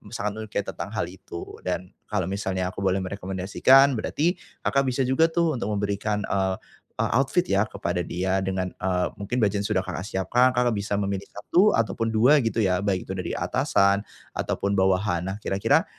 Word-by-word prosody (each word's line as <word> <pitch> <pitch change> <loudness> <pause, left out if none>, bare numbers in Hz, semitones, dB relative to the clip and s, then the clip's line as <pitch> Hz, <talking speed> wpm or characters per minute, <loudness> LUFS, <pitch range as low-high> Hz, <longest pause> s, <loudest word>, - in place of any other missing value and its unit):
sangat 105 -1 -1
menyukai 110 -2 -3
tentang 100 +2 -6
hal 110 - 0
itu, 90 -2 -9
dan 90 0 -4 0.2
kalau 105 -3 -1
misalnya 95 -2 -2
aku 105 - -9
boleh 95 -1 +1
merekomendasikan, 100 +8 +3
berarti 170 - 0 0.2
Kakak 140 -1 +2
bisa 130 +1 +1
juga 130 +6 +3
tuh 165 -5 0
untuk 105 -1 -2
memberikan, 105 +1 -1
eee 95 -1 0 0.4
eee, - - 0
outfit 135 +8 +2
ya 100 - +2
kepada 90 +1 -2
dia 95 +3 -1
dengan, 95 -1 -2
eee, 90 -1 0
mungkin 105 +5 -2
budget 105 -4 +2
yang 100 - -3
sudah 95 -3 +1
Kakak - - -4
siapkan, 120 +7 +2
Kakak 125 -1 +3
bisa 100 -1 -2
memilih 100 -1 -2
1 180 - +3
ataupun 115 0 0
2 125 +7 +5
gitu 115 -1 -2
ya. 95 -4 +2
Baik 95 -2 -1
itu - - -5
dari 90 -2 -3
atasan 100 0 +2 0.3
ataupun 100 0 -1
bawahan. 95 -2 +2
Nah 95 - -4
kira-kira 105 +1 +1
100 Hz, 180 wpm, -25 LUFS, 95-115 Hz, 0.4 s, 2